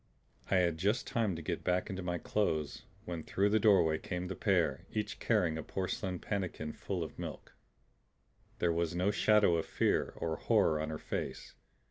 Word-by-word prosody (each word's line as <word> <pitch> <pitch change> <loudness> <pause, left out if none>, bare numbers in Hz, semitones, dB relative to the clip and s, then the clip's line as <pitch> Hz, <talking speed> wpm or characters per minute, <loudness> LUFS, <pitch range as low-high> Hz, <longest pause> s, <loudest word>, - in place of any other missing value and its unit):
I - - +3
had 85 -3 +2
just 105 +7 +1
time 110 -6 0
to 80 - -6
get - - -3
back 90 0 +1
in 95 -3 -4
my 90 0 -1
clothes 80 -6 -1 0.2
when 85 -2 -4
through 100 +5 +1
the 110 +1 +3
doorway 90 -7 +4
came 90 -1 -4
the 95 - -3
pair, - - +1
each 105 -1 -3
carrying 80 -3 +1
a - - -4
porcelain 95 -1 -3
pannikin 90 -6 -3
full 95 -4 -3
of 80 - -8
milk. - - -7 1.0
There 85 -1 +2
was 85 0 -1
no 90 +3 +2
shadow 105 -4 +4
of 80 - -2
fear - - +1
or 80 -1 -2
horror 100 -9 +3
on 80 0 -2
her 80 - -3
face. - - -5
90 Hz, 180 wpm, -33 LUFS, 80-100 Hz, 1.0 s, doorway